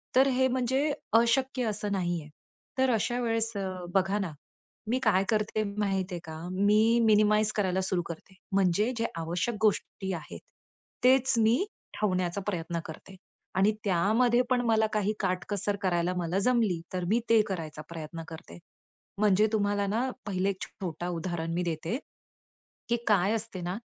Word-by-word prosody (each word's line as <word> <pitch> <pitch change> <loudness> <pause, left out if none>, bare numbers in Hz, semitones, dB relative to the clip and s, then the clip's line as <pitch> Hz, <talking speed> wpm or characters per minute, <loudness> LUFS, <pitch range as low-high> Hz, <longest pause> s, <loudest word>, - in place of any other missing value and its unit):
तर 265 +2 +6
हे 260 0 +4
म्हणजे 260 +3 +1 0.3
अशक्य 255 +2 +1
असं 210 -1 -2
नाही 175 -3 -1
आहे. 150 - -13 0.5
तर 260 0 +3
अशा 240 +3 0
वेळेस 225 -1 0
अ, 195 -1 -2 0.3
बघा 195 +2 +2
ना, 190 -5 -2 0.6
मी 245 - +2
काय 195 -4 +4
करते? 215 -1 +1
माहित 195 -2 0
आहे 175 - -3
का, 160 - -7 0.2
मी 210 +5 +4
मिनिमाइज 215 0 +4
करायला 190 -2 +1
सुरु 185 -1 0
करते. 170 +3 -9 0.2
म्हणजे 195 +4 +2
जे 230 - 0
आवश्यक 170 +8 -1
गोष्टी 205 -2 0
आहेत, 165 -3 -7 0.6
तेच 260 +1 +5
मी 225 +1 +4 0.4
ठेवण्याचा 185 -2 0
प्रयत्न 170 -3 -2
करते. 165 +4 -10 0.4
आणि 195 +3 +4
त्यामध्ये 220 +6 +3
पण 250 -1 +3
मला 220 -1 +3
काही 210 0 +1
काटकसर 200 +2 -1
करायला 175 -1 +1
मला 175 +2 0
जमली, 220 -9 +2
तर 180 -1 -2
मी 230 - +3
ते 225 -1 +6
करायचा 160 -5 -5
प्रयत्न 165 0 -7
करते. 120 - -10 0.6
म्हणजे 210 0 +4
तुम्हाला 205 -1 +1
ना, 235 +6 0 0.2
पहिले 195 -1 0
एक 195 0 -4
छोटा 175 -2 -5
उदाहरण 165 -1 -3
मी 175 +1 0
देते, 165 +6 -2 0.9
की 235 - +2
काय 200 -1 +3
असते 225 -4 -4
ना? 175 +2 -3
200 Hz, 155 wpm, -29 LUFS, 180-225 Hz, 0.9 s, तर